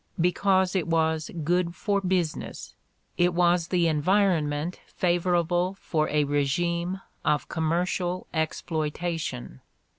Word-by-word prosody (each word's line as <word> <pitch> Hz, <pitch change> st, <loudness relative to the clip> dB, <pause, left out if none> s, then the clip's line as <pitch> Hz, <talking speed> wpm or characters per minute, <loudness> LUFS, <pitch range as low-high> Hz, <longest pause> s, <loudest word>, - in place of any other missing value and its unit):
Because 185 Hz, +2 st, +2 dB
it 180 Hz, -3 st, 0 dB
was 160 Hz, -1 st, +1 dB
"good 175 Hz, +1 st, +1 dB
for 200 Hz, +1 st, 0 dB
business"; 180 Hz, -4 st, -2 dB, 0.5 s
it 175 Hz, 0 st, +3 dB
was 175 Hz, -1 st, +3 dB
the 175 Hz, -2 st, +2 dB
environment 160 Hz, -1 st, +1 dB
favorable 175 Hz, +1 st, +1 dB
for 155 Hz, -2 st, 0 dB
a 150 Hz, 0 st, +2 dB
regime 170 Hz, +6 st, 0 dB, 0.2 s
of 150 Hz, -1 st, +1 dB
commercial 175 Hz, +2 st, -1 dB
exploitation. 160 Hz, -, -3 dB
170 Hz, 100 wpm, -26 LUFS, 155-180 Hz, 0.5 s, it